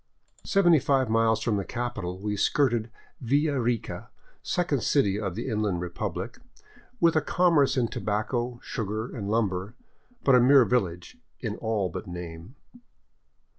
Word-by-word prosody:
Seventy 175 -5 +5
five 130 -3 +1
miles 115 0 +2
from 110 -3 +1
the 100 - -1
capital 105 -6 -4
we 105 +2 -3
skirted 120 0 +1 0.3
Villa 140 +3 +1
Rica, 120 -1 -2 0.3
second 170 -8 0
city 105 -8 +2
of 100 -5 -3
the - - -4
Inland 105 -6 -1
Republic, 90 - -5 0.6
with 170 -4 +4
a 155 - +4
commerce 165 -7 +3
in 120 -2 +2
tobacco, 120 +4 -2
sugar, 110 +3 -4
and 100 -4 -4
lumber, 105 -2 -1 0.5
but 135 - +4
a 125 - +7
mere 130 0 +6
village 90 -7 -1 0.2
in - - -3
all 110 -4 -1
but 90 - -7
name. 85 - -8
115 Hz, 140 wpm, -27 LUFS, 100-135 Hz, 0.6 s, a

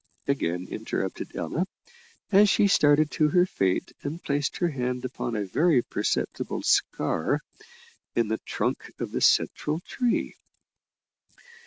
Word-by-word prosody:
again 90 -10 -1
interrupted - - -4
Ella, 180 +4 -2 0.6
as 205 +1 +6
she 200 - +4
started 150 -5 +4
to 155 -2 +2
her 180 +2 +4
feet 95 - 0
and 155 +5 -5
placed 140 0 -1
her 175 - +1
hand 125 -3 -2
upon 120 -2 -4
a 105 -1 -1
very 145 - +3
perceptible - - -2
scar - - +1 0.8
in 115 -2 +2
the 110 +1 -1
trunk - - -3
of - - -4
the - - -2
central 150 +2 +2
tree. 245 +4 -1
145 Hz, 130 wpm, -26 LUFS, 120-175 Hz, 0.8 s, as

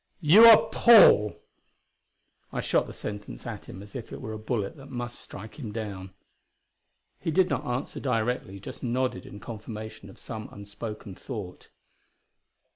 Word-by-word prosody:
"You 190 +7 +8
are 225 -2 +9
'Paul'!" 200 - +6 1.1
I - - -3
shot - - +1
the - - -8
sentence 105 - -7
at - - -7
him 95 - -9
as 100 - -15
if 120 -3 -7
it - - -7
were 110 -4 -6
a 110 - -6
bullet 110 0 -3
that 135 0 -13
must 120 -1 -5
strike 110 +8 -11
him 115 -7 -6
down. 100 -4 -6 1.1
He - - -3
did 185 +3 +3
not - - -2
answer 125 +3 -3
directly; 115 -5 -2
just 95 - -9
nodded 125 -5 -2
in 100 - -10
confirmation 110 -2 -8
of 95 - -15
some 110 -1 -8
unspoken 100 0 -8
thought. 100 -4 -8
110 Hz, 155 wpm, -27 LUFS, 100-130 Hz, 1.1 s, are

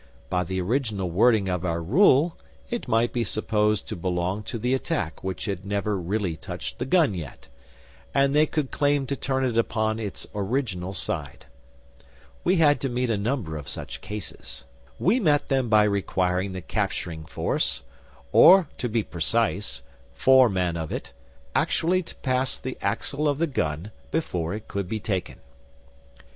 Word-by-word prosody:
By 90 0 +2
the 95 +2 -3
original 105 -3 -1
wording 105 +2 +4
of 90 -1 -1
our 85 -2 0
rule, 145 - +4 0.4
it 240 - -3
might 115 +1 +2
be 120 - +1
supposed 105 -1 0
to - - -4
belong 90 +3 -1
to - - -4
the 125 +3 0
attack 135 - -2
which 95 -1 -3
had 100 -3 -3
never 100 +1 -1
really 95 -1 -1
touched - - -7
the 125 - -1
gun 160 - +4
yet, 75 -7 -8 0.6
and 140 0 +3
they 150 +1 +5
could 150 -4 -2
claim 145 -1 +2
to 140 - -2
turn 135 -1 -1
it 115 -2 +1
upon 110 -1 0
its 105 -4 -5
original 100 -3 -2
side. 95 - -4 1.0
We 180 - +3
had 150 -4 +4
to 135 - -1
meet 125 0 0
a - - +2
number 105 - -2
of 70 -2 -7
such - - -6
cases. 105 -10 -7 0.3
We 215 +9 +3
met 150 - +2
them 130 -3 +1
by 110 -1 +6
requiring 95 -2 0
the 95 - -5
capturing 80 -1 -3
force - - -1 0.5
or, 185 -2 +8
to 125 - -1
be 110 0 +1
precise, 100 +3 -1 0.3
four 130 -2 +6
men 90 -3 0
of 80 -2 -4
it 60 - -5 0.4
actually 180 +3 +2
to 170 - -12
pass 130 0 0
the - - -5
axle 150 +1 -1
of 145 - 0
the 170 - +2
gun 85 - -2 0.2
before 90 - -1
it 110 - -8
could 100 -2 -3
be 110 - -2
taken. 95 -3 -3
110 Hz, 165 wpm, -25 LUFS, 90-135 Hz, 1.0 s, or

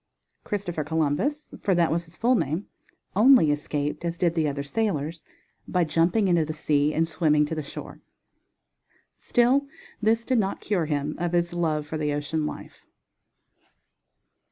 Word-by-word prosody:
Christopher 180 -6 -3
Columbus, 160 - -1
for 190 - +2
that 170 -1 +2
was 170 +1 -1
his 165 +1 -15
full 245 +3 +3
name, 165 - 0 0.5
only 220 - +6
escaped, 145 +1 -2
as 170 0 -2
did 170 -1 +1
the 160 -2 +1
other 140 -1 -2
sailors, 165 -3 -2 0.4
by 180 -1 +1
jumping 170 +6 +2
into 175 -3 +3
the 155 0 -4
sea 150 -1 +1
and 160 +1 +1
swimming 150 -2 +2
to 150 - -4
the 155 - -2
shore. 145 - -9 1.1
Still 255 +4 +2 0.3
this 225 +2 +2
did 255 -3 +2
not 195 -2 -1
cure 180 -6 -1
him 145 0 -1
of 175 0 -1
his 170 0 +1
love 155 -3 0
for 155 +1 -5
the 150 -1 0
ocean 150 +1 -2
life. - - -9
165 Hz, 155 wpm, -25 LUFS, 150-195 Hz, 1.1 s, only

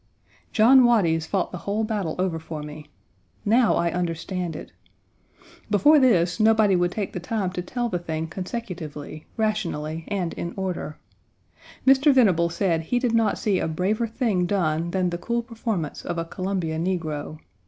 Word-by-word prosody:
John 245 +4 +6
Waties 175 -10 +3
fought 195 -3 -1
the 180 - -6
whole 205 +4 -1
battle 205 -7 -2
over 180 -3 -1
for 160 -1 -7
me. 150 0 -9 0.6
Now 230 +2 +4
I 170 0 +1
understand 175 0 -3
it. - - -9 1.0
Before 290 +9 +5
this 185 -8 +3
nobody 215 -2 +4
would 175 0 +1
take 205 -1 -4
the - - -3
time 190 +1 -2
to 180 - -3
tell 240 +7 -2
the 180 -6 -2
thing 160 -2 -3
consecutively, 165 -5 -6
rationally, 165 -8 -2
and 185 -5 -2
in 170 - -5
order. 185 -5 -4 0.9
Mr. 270 +2 +6
Venable 190 -11 +4
said 170 -1 0
he 205 +10 -1
did 245 -2 0
not 225 -2 +2
see 200 -4 +1
a - - -1
braver 195 +8 0
thing 215 -6 0
done 170 -4 0
than 180 0 0
the 175 - -3
cool 235 +6 -1
performance 225 - -4
of 175 - -4
a 165 - -2
Columbia 180 -3 -3
negro. 160 -4 -3
180 Hz, 165 wpm, -24 LUFS, 165-220 Hz, 1.0 s, John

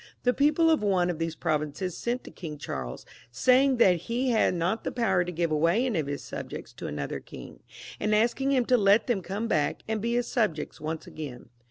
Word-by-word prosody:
The 250 - +3
people 300 +4 +3
of 315 - +3
one 185 -4 +2
of 165 - -7
these 165 -1 -2
provinces 155 +4 -2
sent 245 +1 -2
to - - -11
King 155 -4 -7
Charles, 65 - -6 0.2
saying 255 - +4
that 185 -7 +5
he 245 +3 0
had 220 -5 +3
not 175 +6 -1
the - - -2
power 230 -7 +2
to 175 - -5
give 170 -1 -1
away 170 +10 +2
any 225 -10 0
of 150 - -2
his 145 0 -4
subjects - - -7
to - - -7
another 75 -1 -4
king, - - -11 0.4
and 215 0 +1
asking 240 +5 +2
him 255 -3 +3
to 250 - +4
let 205 +1 +4
them 240 -7 0
come 200 +6 -3
back 150 -8 0
and 220 -1 -1
be 235 +2 0
his 245 0 +1
subjects 210 - -1
once 155 +1 -4
again. 135 -7 -8
195 Hz, 215 wpm, -27 LUFS, 160-240 Hz, 0.4 s, that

